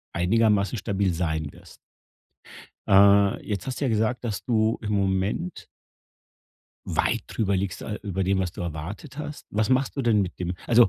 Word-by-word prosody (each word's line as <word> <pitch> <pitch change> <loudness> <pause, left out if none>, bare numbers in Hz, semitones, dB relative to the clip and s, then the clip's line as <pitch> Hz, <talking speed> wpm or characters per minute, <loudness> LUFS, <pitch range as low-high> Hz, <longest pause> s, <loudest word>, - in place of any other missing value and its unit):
einigermaßen 105 +4 +2
stabil 100 -2 0
sein 80 -3 -2
wirst. - - -16 1.1
Äh, 100 0 +5
jetzt 105 +2 -3
hast 130 - -4
du 145 - 0
ja - - +2
gesagt, 110 +2 0
dass 110 -5 -3
du 110 -2 +2
im 105 -1 -3
Moment 100 - -1 1.2
weit - - 0
drüber 100 -3 0
liegst, 95 -2 -3
äh, 105 - -4
über 95 -2 -2
dem, 95 +1 +1
was 90 -2 -1
du - - -9
erwartet 90 - -6
hast. 150 -1 -7
Was 110 +3 0
machst 130 +2 +1
du 135 - 0
denn 110 -4 +3
mit 95 - -5
dem 90 0 -2
also 120 -3 +6
100 Hz, 170 wpm, -25 LUFS, 95-115 Hz, 1.2 s, also